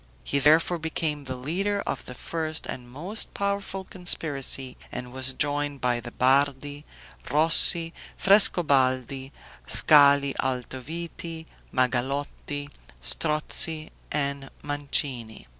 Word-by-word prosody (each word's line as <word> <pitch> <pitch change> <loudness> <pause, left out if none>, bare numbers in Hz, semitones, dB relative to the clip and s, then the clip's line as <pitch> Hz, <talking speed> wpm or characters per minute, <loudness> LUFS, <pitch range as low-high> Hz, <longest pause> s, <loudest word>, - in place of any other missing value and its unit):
He 140 - 0
therefore 160 +4 +4
became 155 -2 -3
the 130 -1 -4
leader 190 +10 -1
of - - -4
the 125 - -9
first 160 +3 -3
and 120 -1 -6
most 175 - -5
powerful 200 -1 -2
conspiracy, 145 -8 -2 0.2
and 125 0 -6
was 130 0 -2
joined 145 0 -1
by 125 -2 0
the 120 0 -8
Bardi, 140 +3 +1 0.4
Rossi, 165 +2 +5 0.2
Frescobaldi, 135 - +3 0.4
Scali 140 -2 +6
Altoviti, 160 +6 -5 0.3
Magalotti, 135 +3 -1 0.3
Strozzi, 155 - -1 0.2
and 140 -2 -2
Mancini. 140 -5 -3
145 Hz, 100 wpm, -26 LUFS, 130-160 Hz, 0.4 s, Scali